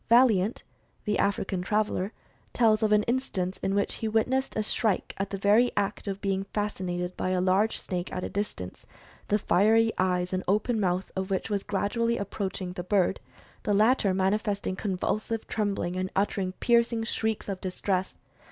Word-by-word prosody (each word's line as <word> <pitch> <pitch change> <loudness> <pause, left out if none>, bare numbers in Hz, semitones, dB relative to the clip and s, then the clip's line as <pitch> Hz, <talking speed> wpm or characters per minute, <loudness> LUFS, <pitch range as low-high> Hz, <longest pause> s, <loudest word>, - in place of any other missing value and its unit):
Valliant, 230 -4 +4 0.4
the 210 -2 0
African 195 -2 0
traveler, 210 0 0 0.4
tells 220 -2 +4
of 215 -1 +2
an 210 0 +5
instance 210 -7 -1
in 195 - -1
which 200 - +1
he 225 - 0
witnessed 250 +5 +1
a 215 - +1
shrike 210 -2 0
in 195 - 0
the 195 - -3
very 210 +5 +4
act 205 +1 -1
of 195 0 -3
being 195 -1 0
fascinated 185 -4 -2
by - - -2
a 185 0 +1
large 190 +4 +2
snake 180 -2 -4
at 180 - -3
a - - -1
distance, 195 - -5 0.4
the 210 - +3
fiery 220 +4 +4
eyes 180 -1 +1
and 185 - -1
open 215 +4 +1
mouth 185 -1 0
of 190 0 -2
which 195 +3 -2
were 205 - +2
gradually 230 +4 0
approaching 190 -2 -4
the 180 - -5
bird, 190 0 +2 0.4
the 205 - +1
latter 215 -1 +4
manifesting 200 +1 0
convulsive 210 +3 -2
trembling 200 -4 -1
and 185 0 -2
uttering 195 -1 0
pierc 235 -1 +3
ing 225 -1 -1
shrieks 220 -1 -2
of 195 -2 -4
distress. 185 0 -2
200 Hz, 170 wpm, -28 LUFS, 185-215 Hz, 0.4 s, an